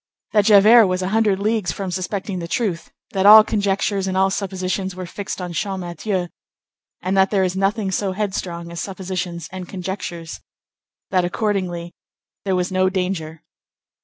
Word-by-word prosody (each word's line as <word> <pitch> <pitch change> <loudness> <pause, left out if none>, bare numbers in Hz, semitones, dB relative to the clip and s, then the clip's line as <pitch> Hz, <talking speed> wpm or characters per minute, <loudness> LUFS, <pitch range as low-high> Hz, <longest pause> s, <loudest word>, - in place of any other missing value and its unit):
that 210 -2 +3
Javert 215 +1 +7
was 185 0 -1
a 185 - -1
hundred 215 -2 +2
leagues 210 -3 0
from 195 -2 -4
suspecting 190 +1 -3
the 170 - -5
truth; 185 -3 -2 0.2
that 195 0 +2
all 215 +1 +11
conjectures 200 -2 0
and 190 0 -1
all 195 0 +3
suppositions 190 -1 -3
were 185 0 -6
fixed 195 +4 -6
on 180 -1 -5
Champmathieu, 185 0 -3 0.7
and 185 +2 0
that 190 0 +4
there 195 -2 +2
is 185 0 -1
nothing 195 +1 0
so 190 0 -1
headstrong 185 -4 -4
as 170 0 -5
suppositions 185 -3 -4
and 185 -1 -7
conjectures; 180 -3 -5 0.7
that 185 -2 +3
accordingly 180 -3 -2 0.5
there 190 -1 +1
was 180 +1 -1
no 185 0 +2
danger. 180 -4 -3
190 Hz, 160 wpm, -21 LUFS, 180-200 Hz, 0.7 s, all